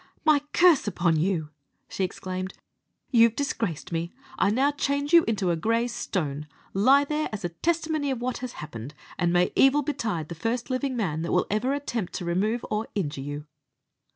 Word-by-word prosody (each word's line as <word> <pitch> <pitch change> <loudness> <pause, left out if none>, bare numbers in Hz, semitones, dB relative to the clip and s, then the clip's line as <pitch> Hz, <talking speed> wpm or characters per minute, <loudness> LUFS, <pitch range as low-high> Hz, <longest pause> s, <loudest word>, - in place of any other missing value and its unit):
"My 305 -2 +6
curse 345 -9 +5
upon 175 -4 +1
you!" 160 -2 0 0.4
she 195 - -3
exclaimed; 185 0 -4 0.6
"you've 230 -3 +5
disgraced 225 - -2
me. 170 +1 -2 0.3
I 200 - +4
now 265 +7 +3
change 285 +1 -1
you 335 -1 +8
into 195 -5 +1
a - - +1
grey 230 +7 +1
stone. 150 - -3 0.3
Lie 260 +9 +5
there 305 +1 -1
as 215 -3 -4
a - - -1
testimony 315 - -1
of 260 -3 -1
what 250 +1 -2
has 255 -1 -5
happened; 140 -1 -8 0.2
and 175 -1 +2
may 175 0 +3
evil 275 +2 +5
betide 220 - -2
the - - -4
first 230 - -2
living 255 0 -1
man 160 -8 -1
that 170 - -3
will - - +3
ever 215 +6 +1
attempt 240 -9 -3
to 175 - -4
remove 210 +7 0
or 215 +1 -1
injure 150 -9 -2
you!" 145 +2 -6
215 Hz, 180 wpm, -26 LUFS, 170-270 Hz, 0.6 s, you